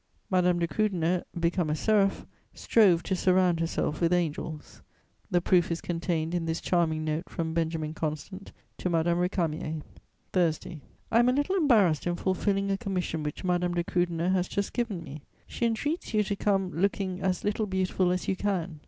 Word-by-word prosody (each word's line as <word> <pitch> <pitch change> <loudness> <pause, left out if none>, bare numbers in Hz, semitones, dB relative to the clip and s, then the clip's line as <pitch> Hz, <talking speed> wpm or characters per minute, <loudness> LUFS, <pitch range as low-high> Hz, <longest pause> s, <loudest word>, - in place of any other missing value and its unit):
Madame 180 -1 +3
de 170 -1 0
Krüdener, 180 -3 0 0.2
become 170 -1 +1
a 150 - +1
seraph, 200 +2 +2 0.3
strove 190 -7 +4
to 190 - -1
surround 180 -2 +3
herself 165 -1 -1
with 170 0 +3
angels; 160 -3 -2 0.5
the 175 - +3
proof 175 0 +3
is 170 0 -1
contained 165 -1 -2
in 175 -2 -1
this 165 0 -1
charming 160 -3 +1
note 155 +3 -2
from 160 -1 -3
Benjamin 160 -2 -1
Constant 160 +5 -5 0.3
to 180 - -1
Madame 170 +1 +1
Récamier: 160 -4 -1 0.5
"Thursday. 165 -2 0 0.3
"I 230 - +5
am 240 +1 +5
a - - +3
little 290 +8 +1
embarrassed 215 - +3
in 175 - 0
fulfilling 195 +2 0
a 195 - -1
commission 185 -7 -2
which 150 +4 -5
Madame 180 -1 0
de 175 - +1
Krüdener 175 0 0
has 185 -1 +1
just 200 0 -2
given 220 -8 -2
me. 150 -1 -9 0.2
She 235 - -1
entreats 260 +4 -2
you 210 - +4
to 200 0 -2
come 195 -2 0
looking 190 +2 -1
as 185 -1 0
little 210 +1 0
beautiful 185 -1 +1
as 180 0 -1
you 190 - +1
can. 185 -5 -2
180 Hz, 180 wpm, -28 LUFS, 165-195 Hz, 0.5 s, I